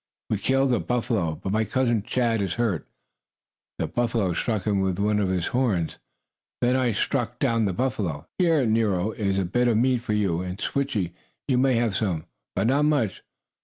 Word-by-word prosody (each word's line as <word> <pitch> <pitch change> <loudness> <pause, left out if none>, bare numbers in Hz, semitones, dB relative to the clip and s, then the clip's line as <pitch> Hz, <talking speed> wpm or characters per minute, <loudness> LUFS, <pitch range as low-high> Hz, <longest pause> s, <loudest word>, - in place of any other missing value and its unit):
"We 105 - +1
killed 135 +2 +2
a 120 - +2
buffalo, 110 -9 -1
but 95 - -5
my 110 +2 +2
cousin, 120 -1 +1
Chaw, 125 +1 0
is 100 -5 -1
hurt. 110 -9 -1 0.9
The - - -1
buffalo 115 0 0
stuck 110 +2 -1
him 100 -2 +1
with 95 -2 0
one 105 +1 +1
of 100 -2 +1
his 90 -2 0
horns. 110 -11 0 0.6
Then 125 +1 +2
I 130 -2 +2
struck - - -1
down 115 -1 +1
the 95 - 0
buffalo. 100 - -2
Here, 165 -7 +3
Nero, 110 -3 +1
is 100 -3 -1
a 95 - +1
bit 120 +8 +1
of 115 -3 +3
meat 125 +1 +2
for 110 - -2
you, 95 -5 +1
and, 90 0 -5
Switchie, 110 -12 -1 0.3
you 130 -3 +2
may 130 -1 +3
have 115 -4 +1
some. 90 -7 -1 0.3
But 95 - +1
not 140 +5 +3
much. 145 -10 +1
110 Hz, 190 wpm, -25 LUFS, 95-125 Hz, 0.9 s, Here